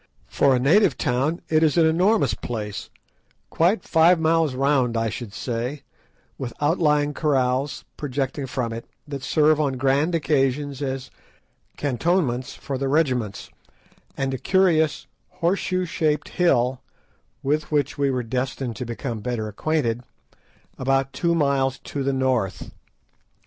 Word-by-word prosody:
For 135 -2 +3
a - - +1
native 160 - +4
town 135 +8 0
it 155 0 +3
is 160 0 +3
an 165 - +6
enormous 185 +7 +3
place, 105 -4 -5 0.6
quite 180 +4 +2
five 165 +2 +4
miles 160 -3 +2
round, 130 -3 +2
I 115 0 0
should 110 -1 -6
say, 125 +6 -4 0.6
with 120 -3 -4
outlying 150 -1 +2
kraals 135 -2 0
projecting 135 0 -3
from 125 -3 -2
it, 115 0 -7 0.2
that 140 -2 -5
serve 155 +2 +3
on 140 -3 0
grand 140 +6 +2
occasions 145 -2 0
as 135 -1 -4 0.7
cantonments 140 -2 0
for 135 -2 -5
the 135 - -1
regiments, 130 -8 0 0.7
and 135 -1 -1
a 130 - -3
curious 165 -4 +2 0.3
horseshoe 185 +1 0
shaped 155 -3 -1
hill, 130 -7 +2 0.6
with 150 +3 0
which 145 -2 +1
we 140 -1 +2
were 130 -2 -1
destined 125 0 -3
to 125 - -4
become 120 0 -4
better 115 -1 -3
acquainted, 120 +1 -1 0.8
about 135 +1 +1
two 170 -1 +1
miles 135 -3 +1
to 140 - -6
the 135 +1 +1
north. 130 -8 -1
140 Hz, 135 wpm, -23 LUFS, 125-155 Hz, 0.8 s, an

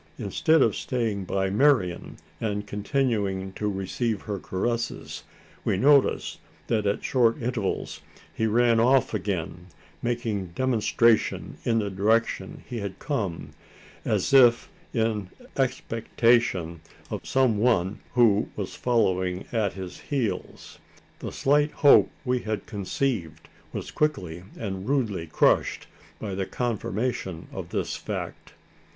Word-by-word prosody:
Instead 160 -2 +3
of 110 - +2
staying 110 -6 -2
by 95 +1 0
Marian, 105 -7 +2 0.2
and 105 -2 -2
continuing 105 -3 -1
to 105 +1 -2
receive 100 +3 -2
her 100 -2 -4
caresses, 115 +7 -3 0.4
we - - +1
noticed 140 +4 +3 0.3
that 110 -3 0
at 100 - -1
short 120 -3 +2
intervals 115 -5 -2 0.3
he 110 - 0
ran 115 +1 +3
off 130 +2 +3
again, 90 -3 -3 0.3
making 115 -5 -2
demonstration 115 -2 +2
in 115 -1 +2
the 105 -2 -1
direction 110 +4 0
he 120 - -4
had 100 -2 -5
come 100 - -3 0.5
as - - 0
if 120 -3 +6 0.2
in 110 -4 -1 0.3
expectation 115 - +1 0.3
of - - -4
some 130 -5 +2
one 105 -5 +2 0.2
who 110 -4 +4
was 100 -3 -4
following 95 -6 0
at 110 -5 0
his 95 -2 -7
heels! 130 -7 -4 0.4
The - - -5
slight 145 +2 +2
hope 145 - +6 0.2
we 125 0 +1
had 110 -3 -4
conceived 100 - -3 0.2
was - - -5
quickly 90 - -1
and 95 0 -4
rudely 110 -12 0
crushed, 80 - +2 0.3
by 105 -3 -5
the 95 0 -2
confirmation 110 -6 -2
of - - -6
this - - -2
fact. - - -6
110 Hz, 120 wpm, -26 LUFS, 95-120 Hz, 0.5 s, if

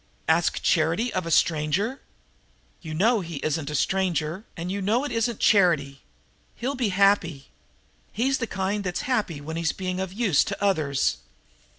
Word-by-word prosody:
"Ask 160 +1 +2
charity 165 +9 +1
of 185 -2 -2
a - - -2
stranger?" 165 - +1 0.8
"You 155 -1 -6
know 220 +7 +3
he 170 -2 -7
isn't 155 -1 -1
a 150 - -3
stranger, 180 - 0
and 175 +2 -4
you 200 +1 -3
know 220 +7 +1
it 290 - -4
isn't 230 -1 -1
charity. 160 -9 +3 0.5
He'll 255 +4 -3
be 250 -6 0
happy. 185 -7 +2 0.6
He's 265 +5 0
the 230 - -2
kind 200 +1 -2
that's 180 -2 -2
happy 210 - -1
when 160 +3 -5
he's 165 -2 0
being 185 -1 -3
of 190 -1 -3
use 195 - +2
to 200 - -4
others?" 155 - +1
185 Hz, 165 wpm, -25 LUFS, 160-210 Hz, 0.8 s, know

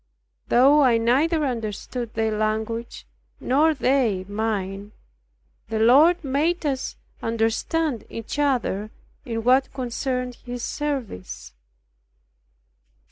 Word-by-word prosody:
Though 275 +5 +5
I 250 -4 +5
neither 290 +8 +2
understood 235 0 -4
their 220 -1 0
language 220 +2 -2 0.3
nor 300 +5 +3
they 250 -9 +1
mine, 205 -1 -3 0.8
the 225 - -2
Lord 290 +11 +5
made 305 +5 0
us 270 -2 -2 0.3
understand 230 +5 -1
each 230 +5 -6
other 245 -7 0 0.4
in 225 -2 -3
what 260 +3 +3
concerned 250 -1 -3
His 245 -1 -6
service. 270 - -4
245 Hz, 95 wpm, -24 LUFS, 220-275 Hz, 0.8 s, Though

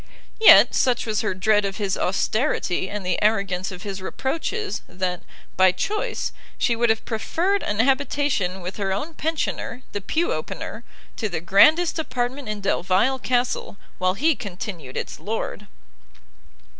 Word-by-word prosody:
Yet, 445 - +8
such 250 -2 +2
was 215 -2 0
her 215 -4 -1
dread 210 +2 +3
of 195 0 -3
his 200 -3 -1
austerity 195 -1 0
and 205 -2 -5
the 180 - 0
arrogance 195 -3 +1
of 180 +1 -8
his 195 -2 -5
reproaches, 330 - -3
that, 180 -1 -3 0.3
by 185 0 +5
choice, 425 - -2 0.3
she 235 - +2
would 235 0 +2
have 220 0 +1
preferred 340 - 0
an 205 - -2
habitation 265 -7 +1
with 180 +2 -6
her 195 -2 -1
own 290 +13 -3
pensioner, 305 -6 -3
the 205 - -4
pew 325 - 0
opener, - - -5 0.3
to 215 - -2
the 170 -4 -2
grandest 315 - +4
apartment 255 -3 -3
in 210 -1 -4
Delvile 195 +7 +1
Castle 245 -5 -1 0.2
while 185 0 +1
he 310 +6 +2
continued 180 - -7
its - - -5
lord. 210 -1 -4
215 Hz, 150 wpm, -23 LUFS, 190-265 Hz, 0.3 s, Yet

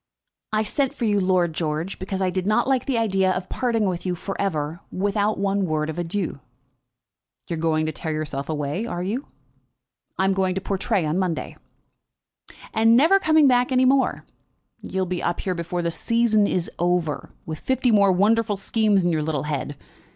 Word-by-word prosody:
"I 215 0 +1
sent 270 +5 0
for 240 - -2
you, 205 -2 +2
Lord 185 -3 +2
George, 160 +3 -3
because 190 0 -3
I 185 - +1
did 185 +1 -2
not 215 - +2
like 265 -2 +1
the 265 -4 +1
idea 195 -4 +2
of 185 0 -3
parting 230 -4 0
with 180 -2 -2
you 180 -1 -1
for 195 +3 -5
ever, 160 -4 -2
without 205 +2 0
one 195 0 0
word 155 0 -1
of 160 - -6
adieu." 175 -2 -3 1.1
"You - - -3
are - - -5
going 160 -1 +1
to 155 - -1
tear 160 +1 -5
yourself 150 -2 -4
away; 150 +8 -2
are 175 -6 -3
you?" 230 +9 -3 0.9
"I 190 - +2
am 195 - +3
going 190 -1 0
to - - 0
Portray 195 -1 -1
on 155 +4 0
Monday." 180 -4 -2 1.2
"And 225 +1 +5
never 335 +9 +5
coming 315 -5 +4
back 250 0 +3
any 255 0 +4
more? 265 +1 +2 0.6
You'll 190 0 -2
be 180 0 -3
up 175 - -1
here 185 - -1
before 175 0 -3
the 170 - 0
season 220 +1 +2
is 180 -3 -1
over, 175 -3 0 0.2
with 155 -1 -5
fifty 260 -1 +1
more 200 -2 +5
wonderful 210 +3 +2
schemes 210 -1 +2
in 175 - +2
your 155 -2 0
little 150 -3 -2
head. 145 -1 -3
190 Hz, 190 wpm, -23 LUFS, 170-220 Hz, 1.2 s, And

